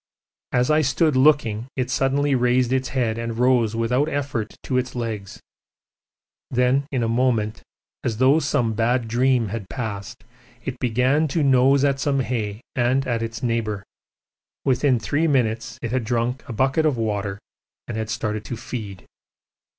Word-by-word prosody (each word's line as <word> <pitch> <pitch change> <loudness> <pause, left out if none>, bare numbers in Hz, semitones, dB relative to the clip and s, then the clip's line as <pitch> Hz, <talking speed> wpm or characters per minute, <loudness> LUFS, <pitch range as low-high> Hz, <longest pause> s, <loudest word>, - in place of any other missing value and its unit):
As 125 +4 +2
I 155 +1 +4
stood 150 +2 +2
looking 130 -5 +3
it 125 -1 -2
suddenly 140 +3 +1
raised 125 0 +2
its 130 0 0
head 115 -4 -1
and 115 -1 -4
rose 120 -3 +3
without 125 +6 +1
effort 135 -7 -3
to 130 -1 0
its 125 0 -4
legs; 110 -5 -4 1.1
then 125 +3 +2
in 130 -4 0
a - - +1
moment, 115 -3 0 0.4
as 110 -3 -1
though 130 +5 +5
some 120 -8 0
bad 115 +2 +1
dream 120 -1 +2
had 100 -3 -5
passed, 105 -3 -5 0.4
it 130 -1 -4
began 130 +6 +2
to 155 +2 0
nose 135 +1 +4
at 140 -1 +2
some 140 -1 +1
hay 110 -4 -3
and 130 +2 +2
at 115 -2 -1
its 115 +2 -5
neighbour. 110 -4 -1 0.8
Within 130 0 +3
three 150 +8 0
minutes 120 -4 0
it 120 - -2
had 130 -1 0
drunk 120 +3 -1
a - - -3
bucket 135 +7 +2
of 140 -5 0
water 105 -3 -2 0.5
and 120 - -5
had 110 -1 -3
started 110 -1 -2
to 120 - -5
feed. 105 -5 -7
125 Hz, 160 wpm, -23 LUFS, 115-135 Hz, 1.1 s, though